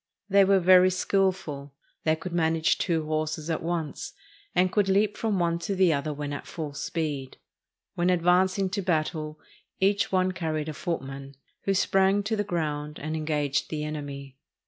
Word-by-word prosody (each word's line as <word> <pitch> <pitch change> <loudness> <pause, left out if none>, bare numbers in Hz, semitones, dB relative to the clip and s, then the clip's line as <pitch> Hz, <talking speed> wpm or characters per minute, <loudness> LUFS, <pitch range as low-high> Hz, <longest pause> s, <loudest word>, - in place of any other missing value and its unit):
They 200 0 +6
were 195 0 +4
very 185 +1 +6
skillful. 185 -7 -1 0.3
They 155 0 +3
could 170 +2 -7
manage 160 -1 +2
two 165 -4 0
horses 155 +1 -2
at 160 - -1
once, 165 -3 -3 0.4
and 180 0 +3
could 205 -1 +2
leap 205 +2 +2
from 220 -3 -1
one 170 -1 +1
to 195 +3 -2
the 185 -3 +4
other 140 +1 -1
when 145 0 -4
at 140 - -6
full 155 -4 -5
speed. 145 -3 -3 0.6
When 175 +1 +1
advancing 185 +2 +3
to 200 +1 -1
battle, 155 -3 -1 0.4
each 200 +1 +2
one 185 -1 +2
carried 160 -4 -3
a - - -4
footman, 140 -4 -5 0.3
who 195 - +2
sprang 195 +1 +3
to 220 +2 -1
the 205 - 0
ground 150 -4 -3
and 155 +2 -4
engaged 150 -3 -1
the 150 -1 -3
enemy. 140 -3 -6
165 Hz, 170 wpm, -27 LUFS, 150-185 Hz, 0.6 s, They